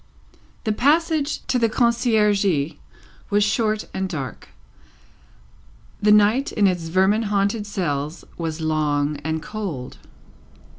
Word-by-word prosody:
The 220 Hz, -, 0 dB
passage 300 Hz, +5 st, +1 dB
to 260 Hz, -1 st, +1 dB
the 230 Hz, -1 st, +2 dB
Conciergerie 210 Hz, -, +2 dB, 0.5 s
was 205 Hz, 0 st, +3 dB
short 215 Hz, 0 st, 0 dB
and 190 Hz, 0 st, -2 dB
dark; 140 Hz, -7 st, -6 dB, 1.5 s
the 210 Hz, 0 st, +4 dB
night 210 Hz, +6 st, +4 dB
in 205 Hz, -, +2 dB
its 175 Hz, -4 st, 0 dB
vermin 190 Hz, +6 st, +2 dB
haunted 205 Hz, +1 st, 0 dB
cells 155 Hz, -5 st, -3 dB
was 165 Hz, -1 st, -4 dB
long 150 Hz, -2 st, 0 dB
and 160 Hz, +2 st, -3 dB
cold. 180 Hz, -13 st, -6 dB
200 Hz, 110 wpm, -22 LUFS, 160-220 Hz, 1.5 s, the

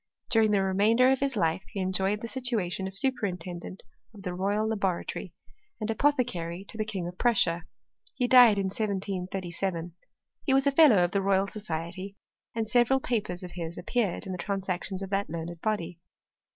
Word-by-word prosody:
During 225 Hz, -2 st, +4 dB
the 200 Hz, -2 st, +3 dB
remainder 215 Hz, +7 st, +4 dB
of 265 Hz, -, +2 dB
his 275 Hz, -2 st, 0 dB
life 165 Hz, -3 st, +1 dB
he 205 Hz, -, -5 dB
enjoyed 190 Hz, +2 st, 0 dB
the 230 Hz, -, -4 dB
situation 225 Hz, -8 st, -1 dB
of 190 Hz, 0 st, -8 dB
superintendent 185 Hz, -8 st, -3 dB, 0.3 s
of 200 Hz, -, -12 dB
the 180 Hz, -2 st, -3 dB
Royal 200 Hz, +4 st, 0 dB
Laboratory, 200 Hz, -5 st, -2 dB, 0.5 s
and 220 Hz, 0 st, -1 dB
apothecary 220 Hz, -10 st, 0 dB
to -, -, -10 dB
the 215 Hz, -, 0 dB
King 195 Hz, -5 st, -4 dB
of 180 Hz, +1 st, -9 dB
Prussia. 180 Hz, -8 st, +2 dB, 0.5 s
He 250 Hz, -, +1 dB
died 245 Hz, -4 st, +8 dB
in 195 Hz, -, 0 dB
1737. 185 Hz, -4 st, -3 dB, 0.5 s
He 265 Hz, -, +2 dB
was 270 Hz, 0 st, +3 dB
a 280 Hz, -, +4 dB
Fellow 270 Hz, -, +6 dB
of 175 Hz, -, 0 dB
the 200 Hz, -, +1 dB
Royal 195 Hz, 0 st, +2 dB
Society, 190 Hz, -1 st, -5 dB, 0.4 s
and 225 Hz, -1 st, -1 dB
several 245 Hz, +4 st, +4 dB
papers 210 Hz, -9 st, -2 dB
of 180 Hz, -, -7 dB
his 170 Hz, -1 st, -6 dB
appeared 200 Hz, +1 st, -1 dB
in 190 Hz, -, -5 dB
the 180 Hz, -, -5 dB
Transactions 190 Hz, 0 st, -3 dB
of 195 Hz, -, -7 dB
that 200 Hz, 0 st, 0 dB
learned 170 Hz, +1 st, -6 dB
body. 180 Hz, -5 st, -2 dB
195 Hz, 175 wpm, -28 LUFS, 180-225 Hz, 0.5 s, died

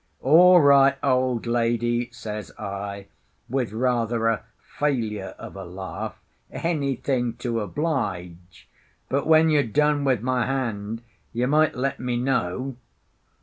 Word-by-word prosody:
"All 175 Hz, +6 st, +7 dB
right, 140 Hz, -1 st, +6 dB
old 130 Hz, -3 st, +1 dB
lady," 120 Hz, 0 st, 0 dB
says 105 Hz, -3 st, -7 dB
I, 100 Hz, 0 st, -5 dB, 0.4 s
with 125 Hz, -3 st, -1 dB
rather 115 Hz, -1 st, 0 dB
a 115 Hz, -, 0 dB, 0.2 s
failure 110 Hz, -9 st, -3 dB
of -, -, -10 dB
a 95 Hz, -, -7 dB
laugh, 95 Hz, +1 st, -7 dB, 0.3 s
"anything 135 Hz, -6 st, -1 dB
to 120 Hz, -1 st, -2 dB
oblige. 95 Hz, -, -4 dB, 0.4 s
But 140 Hz, +3 st, 0 dB
when 160 Hz, 0 st, +5 dB
you're 150 Hz, -1 st, +4 dB
done 145 Hz, +4 st, +1 dB
with 130 Hz, -5 st, +1 dB
my 125 Hz, -1 st, 0 dB
hand, 115 Hz, -4 st, -3 dB, 0.3 s
you 120 Hz, +2 st, 0 dB
might 155 Hz, +3 st, +3 dB
let 135 Hz, +2 st, -2 dB
me 125 Hz, -1 st, -2 dB
know." 130 Hz, 0 st, -1 dB
125 Hz, 125 wpm, -24 LUFS, 110-140 Hz, 0.4 s, All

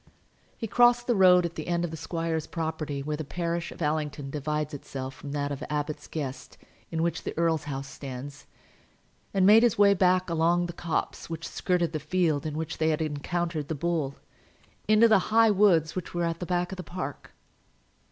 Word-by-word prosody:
He -, -, -4 dB
crossed 240 Hz, +2 st, +4 dB
the 240 Hz, -, +2 dB
road 180 Hz, -3 st, +6 dB
at 170 Hz, -, -3 dB
the 155 Hz, -, -6 dB
end 175 Hz, 0 st, 0 dB
of 165 Hz, -, -5 dB
the -, -, -5 dB
squire's 165 Hz, 0 st, -3 dB
property, 160 Hz, -4 st, -3 dB
where 150 Hz, +1 st, -3 dB
the 155 Hz, -, -4 dB
parish 170 Hz, +2 st, -3 dB
of -, -, -6 dB
Allington 150 Hz, -2 st, -2 dB
divides 150 Hz, +1 st, -2 dB
itself 135 Hz, -1 st, -6 dB
from 140 Hz, +1 st, -9 dB
that 145 Hz, -1 st, -2 dB
of 140 Hz, -, -5 dB
Abbot's 150 Hz, 0 st, -3 dB
Guest 140 Hz, -5 st, -6 dB, 0.3 s
in 165 Hz, -1 st, -1 dB
which 170 Hz, -, -1 dB
the -, -, -6 dB
earl's 165 Hz, -2 st, +1 dB
house 135 Hz, -2 st, -4 dB
stands, 135 Hz, +1 st, -8 dB, 0.8 s
and 190 Hz, -1 st, +3 dB
made 215 Hz, +3 st, +8 dB
his 240 Hz, -3 st, +3 dB
way 200 Hz, 0 st, +6 dB
back 185 Hz, -1 st, +3 dB
along 170 Hz, +1 st, +2 dB
the 175 Hz, -, -5 dB
copse 170 Hz, -1 st, -3 dB
which 165 Hz, 0 st, -5 dB
skirted 180 Hz, -2 st, 0 dB
the 155 Hz, -, -1 dB
field 155 Hz, -1 st, 0 dB
in 150 Hz, 0 st, -4 dB
which 160 Hz, -1 st, -4 dB
they 160 Hz, 0 st, +2 dB
had 155 Hz, -, +1 dB
encountered 155 Hz, +1 st, -2 dB
the 160 Hz, -, -2 dB
bull, 155 Hz, -3 st, -1 dB, 0.7 s
into 215 Hz, +2 st, +6 dB
the 215 Hz, -3 st, +5 dB
high 225 Hz, 0 st, +5 dB
woods 180 Hz, -6 st, +3 dB
which 180 Hz, -1 st, -5 dB
were 175 Hz, -, 0 dB
at 165 Hz, 0 st, -1 dB
the 180 Hz, -, -5 dB
back 180 Hz, 0 st, 0 dB
of 190 Hz, -, -6 dB
the 180 Hz, -, -5 dB
park. 175 Hz, -7 st, -6 dB
165 Hz, 200 wpm, -27 LUFS, 150-180 Hz, 0.8 s, made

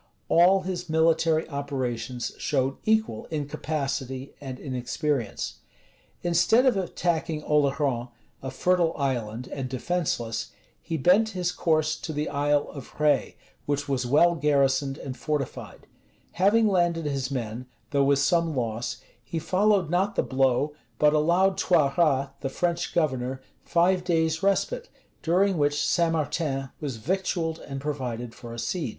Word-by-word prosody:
[*] -, -, -43 dB
All 180 Hz, +3 st, +5 dB
his 180 Hz, -2 st, -4 dB
military 160 Hz, 0 st, +2 dB
operations 130 Hz, -4 st, -3 dB
showed 135 Hz, -1 st, 0 dB
equal 220 Hz, -, +1 dB
incapacity 140 Hz, -3 st, -3 dB
and 130 Hz, -2 st, -7 dB
inexperience. 130 Hz, -2 st, -3 dB, 0.6 s
Instead 175 Hz, +9 st, +4 dB
of 255 Hz, -4 st, +4 dB
attacking 170 Hz, -4 st, -1 dB
Oleron, 140 Hz, -4 st, +1 dB, 0.3 s
a 135 Hz, -, -4 dB
fertile 175 Hz, +2 st, +1 dB
island, 125 Hz, -4 st, -2 dB
and 135 Hz, -2 st, -4 dB
defenceless, 125 Hz, -7 st, -2 dB, 0.3 s
he 165 Hz, -1 st, -3 dB
bent 185 Hz, +10 st, +4 dB
his 180 Hz, -1 st, 0 dB
course 155 Hz, -3 st, +1 dB
to 160 Hz, -, -6 dB
the 150 Hz, +1 st, -2 dB
Isle 145 Hz, 0 st, +1 dB
of 140 Hz, -, -9 dB
Rhé, 150 Hz, -1 st, +1 dB, 0.3 s
which 145 Hz, 0 st, -1 dB
was 130 Hz, -3 st, -1 dB
well 160 Hz, +7 st, +5 dB
garrisoned 140 Hz, -2 st, +1 dB
and 135 Hz, -4 st, -6 dB
fortified: 150 Hz, -2 st, -4 dB, 0.5 s
having 210 Hz, +5 st, +3 dB
landed 175 Hz, -4 st, +1 dB
his 135 Hz, -3 st, -2 dB
men, 125 Hz, -2 st, -4 dB, 0.2 s
though 140 Hz, -1 st, +3 dB
with 140 Hz, 0 st, +4 dB
some 165 Hz, +2 st, +2 dB
loss, 115 Hz, -2 st, -3 dB, 0.2 s
he 140 Hz, +8 st, -5 dB
followed 185 Hz, +1 st, +2 dB
not 195 Hz, +5 st, +1 dB
the -, -, +2 dB
blow, 135 Hz, +2 st, +1 dB, 0.2 s
but 150 Hz, +3 st, +4 dB
allowed 175 Hz, +5 st, +3 dB
Toiras, 145 Hz, -4 st, +2 dB
the 135 Hz, -, -3 dB
French 170 Hz, +4 st, -2 dB
governor, 130 Hz, -5 st, 0 dB, 0.2 s
five 180 Hz, +1 st, +2 dB
days' 160 Hz, -2 st, +1 dB
respite, 470 Hz, -, 0 dB, 0.3 s
during 185 Hz, +1 st, +2 dB
which 145 Hz, 0 st, +2 dB
St. 170 Hz, -2 st, +2 dB
Martin 140 Hz, -3 st, -2 dB
was 140 Hz, -6 st, -4 dB
victualled 170 Hz, -, -1 dB
and 135 Hz, -1 st, -6 dB
provided 125 Hz, -5 st, -4 dB
for 120 Hz, -2 st, -10 dB
a 115 Hz, -, -7 dB
siege. 155 Hz, +3 st, -2 dB
150 Hz, 140 wpm, -26 LUFS, 135-170 Hz, 0.6 s, All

